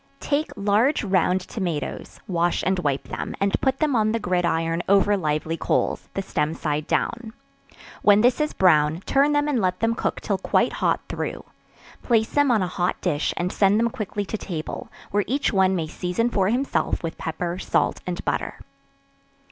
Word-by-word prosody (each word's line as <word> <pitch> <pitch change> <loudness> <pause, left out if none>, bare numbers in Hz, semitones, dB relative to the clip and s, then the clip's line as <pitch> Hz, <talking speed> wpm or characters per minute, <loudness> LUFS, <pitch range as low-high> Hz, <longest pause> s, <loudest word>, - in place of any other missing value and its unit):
Take 295 +2 -1
large 210 +8 +2
round 185 -2 +2
tomatoes, 180 -6 -4
wash 175 -1 0
and 190 0 +1
wipe 140 -5 -1
them, - - -4
and 200 0 +1
put 265 0 +1
them 300 -3 +1
on 215 -1 +2
the 230 - 0
gridiron 170 -3 0
over 200 +1 +4
lively 155 -2 -1
coals - - -1
the 195 - -1
stem 155 -4 -1
side 150 -1 -2
down; 235 -2 -1 0.7
when 205 0 +5
this 245 +5 +3
is 300 - 0
brown, 155 -2 +3
turn 280 +2 +3
them 290 0 +2
and 270 -6 +1
let 185 -1 0
them 225 0 +2
cook - - -2
till - - -2
quite - - +1
hot - - 0
through; - - -4 0.6
place 225 -3 +2
them 290 -1 +2
on 220 -5 +3
a - - -1
hot 180 0 -1
dish 155 -5 0
and 180 +1 -1
send 200 +1 +3
them 235 0 +1
quickly 205 -1 -4
to 220 - -4
table, 160 -5 -5 0.2
where 205 0 +2
each 275 -1 0
one 190 -1 +3
may 165 -3 -1
season 180 +9 -2
for 195 -3 +2
himself 255 -3 0
with 165 - -5
pepper, 170 +2 -3
salt - - 0
and 180 0 -4
butter. - - -2
195 Hz, 180 wpm, -24 LUFS, 175-230 Hz, 0.7 s, when